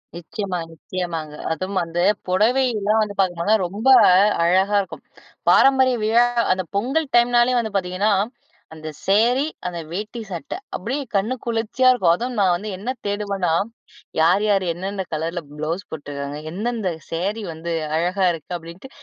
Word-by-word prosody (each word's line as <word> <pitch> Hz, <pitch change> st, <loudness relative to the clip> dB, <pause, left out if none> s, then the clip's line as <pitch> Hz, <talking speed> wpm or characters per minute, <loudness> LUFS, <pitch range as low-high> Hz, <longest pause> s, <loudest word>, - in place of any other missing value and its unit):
நிச்சயமா, 180 Hz, +2 st, -4 dB
நிச்சயமாங்க. 165 Hz, -2 st, -5 dB, 0.2 s
அதுவும் 185 Hz, +4 st, -2 dB
வந்து 170 Hz, +1 st, -2 dB, 0.3 s
புடவ 210 Hz, +7 st, +3 dB, 0.2 s
எல்லாம் 215 Hz, +1 st, +1 dB
வந்து 205 Hz, -1 st, -2 dB
பார்க்கப்போனா 185 Hz, +2 st, +2 dB
ரொம்ப 210 Hz, +8 st, -4 dB, 0.6 s
அழகா 190 Hz, +4 st, +3 dB
இருக்கும். 190 Hz, -, -9 dB, 0.5 s
பாரம்பரிய 260 Hz, -2 st, +5 dB
விழா 230 Hz, +3 st, +4 dB, 0.3 s
அந்த 185 Hz, 0 st, +1 dB
பொங்கல் 270 Hz, +10 st, 0 dB
டைம்னாலே 240 Hz, +1 st, +4 dB
வந்து 220 Hz, -2 st, -3 dB
பார்த்தீங்கன்னா, 190 Hz, +2 st, +1 dB, 0.6 s
அந்த 155 Hz, 0 st, -9 dB, 0.2 s
சேரி, 235 Hz, +8 st, +3 dB, 0.2 s
அந்த 175 Hz, -1 st, -4 dB
வேட்டி 215 Hz, +6 st, -5 dB
சட்டை. 175 Hz, -, -5 dB, 0.2 s
அப்படியே 255 Hz, +9 st, -3 dB
கண்ணு 210 Hz, +6 st, +1 dB
குளிர்ச்சியா 235 Hz, +2 st, +2 dB
இருக்கும். 185 Hz, -10 st, +3 dB
அதுவும் 245 Hz, +3 st, -4 dB
நான் 185 Hz, -3 st, +4 dB
வந்து 210 Hz, +4 st, -5 dB
என்ன 220 Hz, +6 st, -6 dB, 0.2 s
தேடுவனா, 200 Hz, -3 st, -1 dB, 0.7 s
யார் 180 Hz, +6 st, +4 dB
யார் 200 Hz, -2 st, +2 dB
என்னென்ன 190 Hz, +3 st, -4 dB
கலர்ல 165 Hz, +3 st, -2 dB, 0.2 s
ப்ளவுஸ் 165 Hz, +6 st, -3 dB
போட்டுருக்காங்க? 145 Hz, -1 st, -6 dB
எந்தெந்த 215 Hz, +1 st, -2 dB, 0.2 s
சேரி 200 Hz, +6 st, -2 dB
வந்து 165 Hz, +2 st, -6 dB, 0.3 s
அழகா 180 Hz, +4 st, 0 dB
இருக்கு? 165 Hz, 0 st, -8 dB
அப்படின்ட்டு 170 Hz, +9 st, -11 dB
195 Hz, 140 wpm, -22 LUFS, 175-225 Hz, 0.7 s, பாரம்பரிய